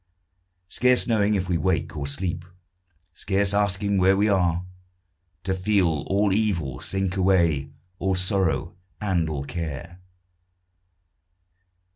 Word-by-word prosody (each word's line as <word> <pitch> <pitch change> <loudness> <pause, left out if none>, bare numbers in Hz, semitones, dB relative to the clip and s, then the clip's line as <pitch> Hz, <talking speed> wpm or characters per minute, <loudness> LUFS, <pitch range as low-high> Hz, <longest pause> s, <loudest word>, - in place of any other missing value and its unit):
Scarce 125 +6 +2
knowing 105 -3 +2
if 95 -2 -1
we 85 -2 0
wake 95 -3 -1
or 70 -2 -4
sleep, 85 +4 -3 0.7
Scarce 100 +2 0
asking 100 0 +1
where 95 +1 +4
we 105 +2 +3
are, 90 -3 +1 0.8
To 95 0 -1
feel 95 -5 +1
all 100 0 +2
evil 85 - -1
sink 95 -1 -2
away, 85 -7 +2 0.3
All 95 -1 0
sorrow 90 -3 0 0.2
and 90 -6 0
all 70 -3 -3
care. 85 +3 -6
95 Hz, 115 wpm, -24 LUFS, 85-100 Hz, 0.8 s, where